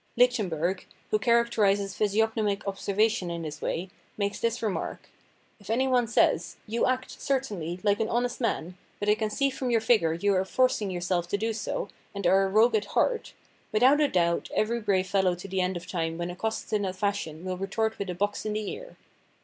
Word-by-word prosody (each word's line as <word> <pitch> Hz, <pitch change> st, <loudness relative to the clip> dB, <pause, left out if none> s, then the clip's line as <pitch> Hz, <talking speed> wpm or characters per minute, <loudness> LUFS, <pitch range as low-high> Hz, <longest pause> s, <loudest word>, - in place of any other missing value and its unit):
Lichtenberg, 190 Hz, -, +1 dB, 0.2 s
who 215 Hz, -, +3 dB
characterises 210 Hz, -4 st, +2 dB
physiognomic 210 Hz, 0 st, 0 dB
ob 195 Hz, 0 st, -2 dB
servation 205 Hz, -2 st, +1 dB
in 170 Hz, -1 st, -4 dB
this 155 Hz, -1 st, -6 dB
way, 185 Hz, +3 st, -3 dB, 0.3 s
makes 200 Hz, 0 st, -1 dB
this 230 Hz, +1 st, -1 dB
remark: 210 Hz, -4 st, -3 dB, 0.5 s
"If 200 Hz, -1 st, -15 dB
any 255 Hz, +4 st, +2 dB
one 250 Hz, -2 st, +3 dB
says, 220 Hz, -, +2 dB
' -, -, -34 dB
You 230 Hz, +2 st, +1 dB
act, 255 Hz, 0 st, -2 dB
certainly, 205 Hz, -, -2 dB
like 205 Hz, 0 st, +2 dB
an 220 Hz, -, 0 dB
honest 245 Hz, +2 st, -1 dB
man, 180 Hz, -6 st, -2 dB, 0.2 s
but 205 Hz, -, 0 dB
I -, -, +7 dB
can 215 Hz, 0 st, -1 dB
see 275 Hz, +6 st, +1 dB
from 260 Hz, -1 st, -3 dB
your 235 Hz, -1 st, +3 dB
figure 215 Hz, -8 st, +3 dB
you 200 Hz, +5 st, +1 dB
are 185 Hz, 0 st, +2 dB
forcing 240 Hz, -1 st, +1 dB
yourself 175 Hz, -1 st, -1 dB
to 200 Hz, -, 0 dB
do 225 Hz, +2 st, -1 dB
so, -, -, -3 dB, 0.3 s
and 200 Hz, -2 st, -4 dB
are 190 Hz, +2 st, +5 dB
a -, -, -1 dB
rogue 220 Hz, +5 st, +4 dB
at 215 Hz, -, +1 dB
heart,' 480 Hz, -2 st, 0 dB, 0.4 s
without 255 Hz, +7 st, +5 dB
a 295 Hz, -, +5 dB
doubt 170 Hz, -6 st, +1 dB
every 230 Hz, +2 st, +1 dB
brave 195 Hz, -4 st, +1 dB
fellow 185 Hz, -1 st, +2 dB
to 180 Hz, +3 st, -9 dB
the 190 Hz, 0 st, -1 dB
end 180 Hz, 0 st, 0 dB
of 175 Hz, -, -8 dB
time 165 Hz, -3 st, -2 dB
when 175 Hz, +1 st, -3 dB
accosted 220 Hz, +5 st, -4 dB
in 210 Hz, -, +2 dB
that 190 Hz, -2 st, -2 dB
fashion 185 Hz, -5 st, -2 dB
will 185 Hz, -1 st, -3 dB
retort 220 Hz, +4 st, -1 dB
with 200 Hz, -1 st, -3 dB
a 180 Hz, -, -3 dB
box 205 Hz, +3 st, -1 dB
in 215 Hz, -, -2 dB
the 215 Hz, -1 st, -2 dB
ear." -, -, -9 dB
205 Hz, 210 wpm, -27 LUFS, 185-225 Hz, 0.5 s, I